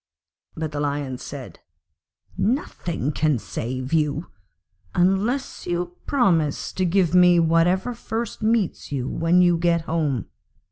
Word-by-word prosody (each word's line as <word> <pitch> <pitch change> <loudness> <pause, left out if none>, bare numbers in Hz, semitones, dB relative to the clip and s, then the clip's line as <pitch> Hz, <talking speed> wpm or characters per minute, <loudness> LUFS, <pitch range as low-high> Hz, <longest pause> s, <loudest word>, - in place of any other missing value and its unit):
But 160 -1 -3
the 145 - -4
Lion 140 -3 -2
said, - - -8 0.8
'Nothing 175 - -1
can 155 -2 +1
save 130 +5 -5
you, 155 +1 0 0.6
unless 195 +9 0
you 175 0 -2
promise 170 - +1
to 185 - 0
give 180 -1 +2
me 180 -1 +6
whatever 170 +7 +2
first 230 0 -5
meets 220 -7 0
you 130 -3 -2
when 170 +5 +3
you 175 -1 +3
get 170 -1 +2
home. 155 - -1
170 Hz, 125 wpm, -23 LUFS, 150-185 Hz, 0.8 s, me